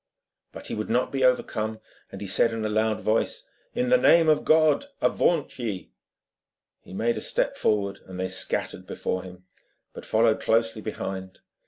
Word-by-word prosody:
But - - -10
he - - -5
would 110 - -4
not 125 +2 +1
be 135 -1 -1
overcome, 110 -3 +1 0.3
and 100 - -7
said 115 +4 +3
in 110 -1 -3
a - - 0
loud 110 0 0
voice: 485 - 0 0.3
'In 250 0 0
the 255 0 +5
name 165 -8 +5
of 155 - +3
God, 155 - +4
avaunt 160 -6 +1
ye!' 105 -7 -4 0.9
He - - -16
made 115 +5 0
a - - -3
step - - 0
forward, 100 -2 0
and 90 -1 -8
they 95 - -1
scattered - - -2
before 95 - -3
him, 90 0 -12 0.5
but - - -9
followed 110 0 +2
closely 115 -1 +1
behind. 95 -3 -6
110 Hz, 170 wpm, -26 LUFS, 100-130 Hz, 0.9 s, the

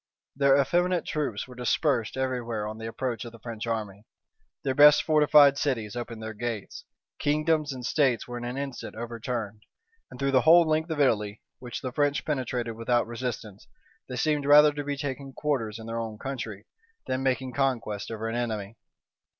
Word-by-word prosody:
Their 140 0 +4
effeminate 175 +5 +1
troops 140 -9 -2
were 125 - -11
dispersed 125 -1 0
every 130 -1 -1
where 115 -3 -3
on 110 +1 -7
the 110 - -5
approach 120 0 -3
of 120 - -8
the 115 - -13
French 115 0 -6
army: 105 -2 -4 0.6
their 135 - 0
best 150 +2 +7
fortified 150 -2 +5
cities 115 -6 -1
opened 115 -2 -6
their 110 0 -5
gates: 110 -2 -5 0.3
kingdoms 155 0 +1
and 130 -2 -6
states 130 -6 +1
were 120 0 -5
in - - -7
an 120 +2 -4
instant 140 -5 -5
overturned; 115 -2 -5 0.5
and - - -12
through 140 0 +1
the 130 -1 +4
whole 165 +3 +7
length 155 +2 +1
of 160 -2 -3
Italy, 105 -6 +1 0.2
which 120 -1 -6
the 130 - -4
French 145 +2 0
penetrated 125 -5 -2
without 120 +1 +1
resistance, 115 -4 -6 0.4
they 125 - -4
seemed 145 +2 0
rather 150 +1 +7
to 145 0 -4
be 145 0 -3
taking 135 -1 -5
quarters 125 -9 -2
in 110 - -9
their 115 0 -3
own 110 -2 -5
country, 115 -5 -6 0.4
than 130 0 -2
making 130 -1 -1
conquests 120 -7 -1
over 110 0 -4
an 115 - -3
enemy. 110 -3 -3
125 Hz, 185 wpm, -27 LUFS, 115-140 Hz, 0.6 s, best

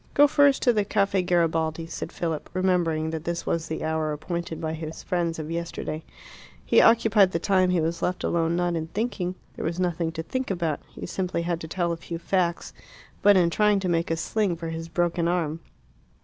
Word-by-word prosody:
"Go 290 - +8
first 285 -1 +4
to 245 - +5
the 210 -2 +2
Caffe 200 -1 +1
Garibaldi," 165 -2 +1
said 165 - -6
Philip, 160 -3 -3
remembering 170 -4 +1
that 160 -1 -4
this 170 0 -3
was 165 -1 -1
the 160 - -4
hour 160 -1 0
appointed 170 +2 -4
by 160 -1 -3
his 160 0 -6
friends 170 -2 -1
of 155 0 -5
yesterday. 165 -2 -4 0.6
He - - +5
occupied 220 -4 +5
the - - +2
time 185 +1 +2
he 180 -1 +2
was 165 +1 -1
left 180 0 -1
alone 165 0 +1
not 175 0 0
in 160 -1 -3
thinking 185 -2 -2 0.2
there - - -4
was 170 +2 -2
nothing 170 -2 0
to 160 - -4
think 260 +9 -3
about; 170 -6 -1
he - - -8
simply 180 -2 -2
had 170 -1 -2
to 160 - -6
tell 170 +1 -1
a 170 - -2
few 165 0 -6
facts 175 0 -1 0.5
but 205 -1 +6
in 170 -2 +3
trying 210 +1 +3
to 190 - -1
make 170 0 +1
a 165 - 0
sling 200 +1 0
for 165 0 -5
his 165 0 -5
broken 170 0 0
arm. 165 -3 0
170 Hz, 205 wpm, -26 LUFS, 165-185 Hz, 0.6 s, Go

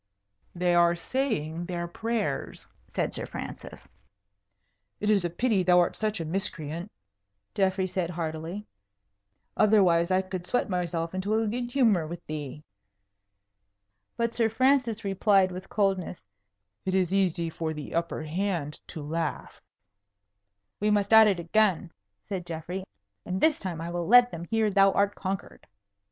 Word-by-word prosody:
"They 175 0 +1
are 170 0 +4
saying 170 - -2
their 175 -1 -3
prayers," 215 -4 -3 0.3
said - - 0
Sir - - -3
Francis. - - -8 1.2
"It 210 +1 +1
is 200 -3 +3
a 175 - 0
pity 210 +3 +1
thou 180 0 +5
art 175 - +2
such 215 -2 -2
a 165 - -3
miscreant," 170 0 -4 0.6
Geoffrey 190 -1 +1
said, 185 -2 -2
heartily; 165 +3 -4 0.9
"otherwise 185 -5 +4
I 185 0 +2
could 185 -1 -6
sweat 245 -4 0
myself 170 -2 -2
into 190 +3 -1
a 225 0 +1
good 240 +3 -2
humour 225 - +3
with 170 +2 -8
thee." 150 -1 -6 1.5
But 235 -1 0
Sir 225 -2 +2
Francis 250 -1 +2
replied 195 -1 +3
with 185 +1 -8
coldness, 195 - -1 0.6
"It 190 0 -1
is 185 -1 +1
easy 175 -4 +1
for 160 0 -3
the 150 -2 -7
upper 170 -1 -2
hand 165 -2 -2
to 155 -4 -7
laugh." 160 +1 -4 1.2
"We 210 - +1
must 205 0 +2
at 220 -1 +9
it 195 -4 +1
again," 180 -1 +1 0.4
said 185 -3 -4
Geoffrey; 170 +3 -5 0.4
"and 185 +1 -3
this 315 +4 +3
time 180 -4 -4
I 170 +1 -5
will 175 -1 -3
let 245 +2 +7
them 170 0 -6
hear 220 +2 +1
thou 195 0 +5
art 200 0 +2
conquered." 195 0 -5
185 Hz, 145 wpm, -27 LUFS, 170-210 Hz, 1.5 s, at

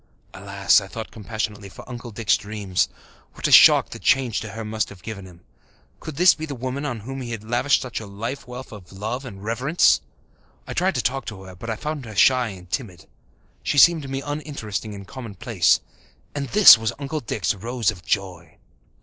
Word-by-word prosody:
Alas, 100 +1 +2
I 95 - -9
thought 110 +3 -7
compassionately, 105 -1 -5
for - - -13
Uncle 120 -1 -8
Dick's 110 -1 +1
dreams! 100 -4 -2 0.4
What - - -2
a - - -2
shock - - +8
the - - -8
change 130 -5 +2
to 110 - -7
her 115 0 -6
must 110 0 -2
have 95 -3 -14
given 100 -4 -7
him! 90 -1 -16 0.6
Could 155 - -8
this 180 +4 +6
be 155 0 -6
the 140 - -5
woman 130 +4 -4
on 120 -6 -4
whom 135 +5 -6
he 120 - -6
had 115 -2 -5
lavished 120 +5 +1
such 125 -2 -5
a 110 - -9
life 115 +8 -6
wealth 125 +1 -9
of 100 -5 -12
love 110 +7 -5
and 100 -6 -9
reverence? 125 +9 +2 0.6
I - - -6
tried 185 +2 +1
to 125 - 0
talk 135 +2 -1
to 95 -4 -8
her, 95 -1 -11
but 115 +6 -8
I 110 - -1
found 150 +2 -5
her 110 -2 -9
shy 125 +5 +4
and 95 -4 -10
timid. 90 -4 -5 0.6
She - - -2
seemed 165 +3 +7
to 140 - -8
me 135 +1 -4
uninteresting 140 -9 -5
and 100 -1 -9
commonplace. 115 - 0 0.5
And 140 -1 -3
this 205 - +9
was 110 -1 -2
Uncle 145 +2 -4
Dick's 110 - -1
Rose 115 +2 -1
of 90 -5 -13
joy! 90 -2 -3
115 Hz, 205 wpm, -23 LUFS, 100-135 Hz, 0.6 s, this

